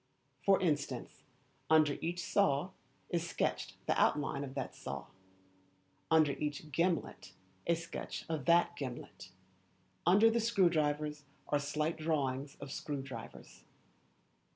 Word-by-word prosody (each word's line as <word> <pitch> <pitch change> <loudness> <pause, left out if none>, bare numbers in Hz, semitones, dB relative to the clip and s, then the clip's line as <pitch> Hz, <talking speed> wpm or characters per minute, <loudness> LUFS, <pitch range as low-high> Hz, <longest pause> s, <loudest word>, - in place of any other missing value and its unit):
For 195 -1 +5
instance, 150 -5 -1 0.5
under 155 -2 +5
each 175 +1 -2
saw 150 -2 +2 0.4
is 170 -1 0
sketched - - -1
the - - +2
outline 145 -1 +2
of 135 -1 -7
that - - -3
saw, 70 0 -6 1.0
under 160 -3 +5
each 150 +1 -4
gimlet 170 +5 -1 0.3
a 170 - +4
sketch 165 0 -6
of 155 -5 -3
that 170 +2 +4
gimlet, 125 - -7 0.7
under 205 +6 +6
the 235 - +2
screw 215 -6 +3
drivers 150 -1 0 0.2
are 145 - +3
slight 150 +3 -1
drawings 140 -3 -1
of 140 -1 -7
screw 145 -1 -4
drivers. 125 -4 -10
150 Hz, 125 wpm, -34 LUFS, 140-170 Hz, 1.0 s, under